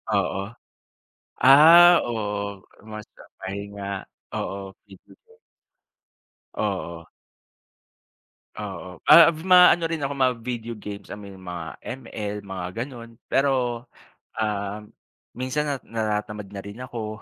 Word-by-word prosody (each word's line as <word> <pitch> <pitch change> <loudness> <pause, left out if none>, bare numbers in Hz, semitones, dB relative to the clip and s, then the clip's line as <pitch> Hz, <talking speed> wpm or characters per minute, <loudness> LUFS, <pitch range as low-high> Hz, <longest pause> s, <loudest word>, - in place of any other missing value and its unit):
Oo. 95 +1 -1 0.9
Ah, 165 +6 +9
oo, 105 -3 -4 0.2
mas 110 -1 -9 0.3
pahinga, 100 0 -6 0.3
oo. 100 0 -5 0.2
Video 95 -2 -17
games. 460 0 -24 1.2
Oo. 90 -5 -4 1.5
Oo, 95 -4 -8
ah, 170 -2 +10 0.2
maano 180 -2 +6
rin 165 - -2
ako 140 0 -2
ma-video 120 -3 -1
games, 100 -1 -8
I - - -6
mean 100 -1 -11
mga 90 -3 -6 0.4
ML, 105 -2 -5
mga 95 -2 -5 0.2
gano'n. 115 -4 -12
Pero, 125 -4 +1 0.5
ah, 105 -1 -3 0.5
minsan 130 +4 -2
nat 140 -2 -3
natatamad 105 -2 -3
na 100 -1 -6
rin 100 +3 -9
ako. 110 -3 -6
105 Hz, 105 wpm, -24 LUFS, 100-130 Hz, 1.5 s, ah